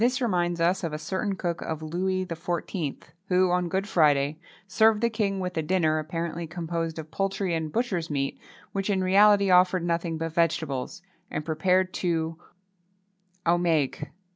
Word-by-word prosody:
This 250 +2 +2
reminds 175 -7 0
us 180 +3 +2
of 165 -2 -2
a - - -2
certain 190 +6 -2
cook 175 -3 -3
of 160 -1 -4
Louis 185 +4 -1
XIV., 170 -2 -3 0.3
who, 185 -1 +3
on 180 -1 +1
Good 195 +3 -1
Friday, 150 -4 +3 0.3
served 220 +3 +4
the 235 +1 +1
king 200 -3 -1
with 180 -1 -3
a - - +2
dinner, 155 -2 +1
apparently 165 +1 -4
composed 165 -1 -3
of 160 -1 -7
poultry 195 -1 -1
and 160 -2 -2
butcher's 190 -8 -1
meat, 140 -2 -2 0.3
which, 195 +1 -2
in 190 -2 +1
reality, 200 +1 +5
offered 180 0 +4
nothing 170 -1 -1
but 165 0 -4
vegetables, 160 -2 -1 0.3
and 150 - -4
prepared, 180 +4 +1
too, 165 -2 -1 1.1
au 170 +1 +3
maigre. 160 -6 0
175 Hz, 165 wpm, -26 LUFS, 160-190 Hz, 1.1 s, reality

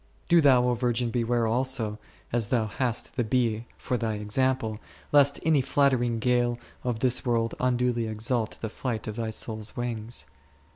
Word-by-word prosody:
Do 170 -1 +5
thou, 130 -4 +5
O 125 - +2
virgin, 120 0 0
beware 120 -1 +1
also, 115 -2 +1 0.3
as 120 -3 +1
thou 115 -2 +1
hast 120 +4 -2
the 120 - +2
bee 115 -1 0
for 125 - -2
thy 115 -2 -2
example, 110 +1 0 0.3
lest 140 -1 +5
any 155 -4 +4
flattering 130 -3 +2
gale 120 +1 +1 0.3
of 120 -3 -2
this 125 -1 +2
world 115 -2 0
unduly 125 -2 +1
exalt 110 +1 -1
the 110 - -2
flight 115 -1 -4
of 105 - -4
thy 115 -1 -2
soul's 110 0 -3
wings. 120 -1 -3
120 Hz, 160 wpm, -27 LUFS, 110-125 Hz, 0.3 s, Do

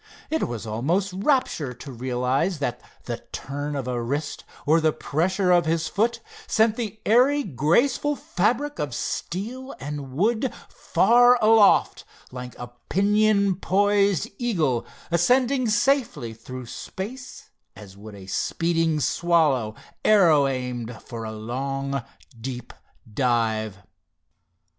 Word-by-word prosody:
It 320 - 0
was 120 -2 -5
almost 165 - -1
rapture 195 - 0
to 135 +3 -10
realize 130 +7 -1
that 125 -4 -3 0.2
the - - -4
turn 145 +2 -4
of 135 -3 -3
a 125 -1 -2
wrist, 145 +5 -3 0.2
or 160 +3 +4
the 155 0 +3
pressure 180 +6 0
of 175 -2 +4
his 165 0 0
foot 230 +3 0 0.3
sent 220 0 +3
the 220 -3 -5
airy, 265 +6 +4
graceful 235 - +1
fabric 250 +8 -1
of 140 -5 -3
steel 245 +9 -4
and 145 -1 -6
wood 225 - +1 0.2
far 245 +1 +4
aloft, 220 -1 +4 0.3
like 125 -1 -8
a 120 0 -8 0.2
pinion 200 -1 +3
poised 200 -3 +2
eagle, 160 - 0 0.2
ascending 250 +8 +2
safely 235 - +1
through 125 +3 -9
space 225 - -8 0.2
as 95 -2 -12
would 105 +1 -11
a 95 -1 -11
speeding 165 - 0
swallow 150 -9 +1 0.3
arrow 165 -9 +5
aimed 125 -3 -4
for 115 -2 -7
a 110 - -5
long, 135 +5 -3 0.4
deep 125 -1 -6 0.4
dive. 110 -5 0
160 Hz, 120 wpm, -24 LUFS, -, 0.4 s, arrow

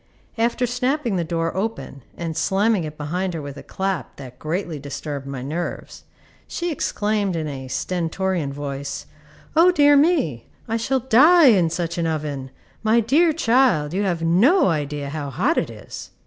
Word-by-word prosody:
After 235 +2 +1
snapping 250 -1 -1
the 175 - 0
door 165 0 -2
open 200 -8 -4 0.2
and 165 -2 -4
slamming 195 0 +1
it 155 0 -8
behind 180 +5 -3
her 160 - -4
with 140 -1 -7
a 140 - -9
clap 190 -8 -3
that 130 -2 -11
greatly 165 0 -3
disturbed 140 0 -6
my 135 -2 -5
nerves, 165 +6 -5 0.4
she 345 0 -3
exclaimed 210 - -1
in 160 -2 -2
a 135 -2 -6
stentorian 175 0 -2
voice, 140 -1 -5 0.5
"O 335 +3 +6
dear 290 -4 +5
me! 280 - +2 0.2
I 225 - -1
shall 255 +3 0
die 280 +6 +6
in 185 -7 +4
such 170 +1 -3
an 165 - 0
oven! 145 -4 -3 0.3
My 225 +1 +3
dear 295 +9 +3
child, 235 - +2
you 195 - 0
have 175 -5 -1
no 200 - +4
idea 145 -3 -2
how 145 -1 -4
hot 210 - +1
it - - -3
is!" - - -9
175 Hz, 165 wpm, -22 LUFS, 150-235 Hz, 0.5 s, O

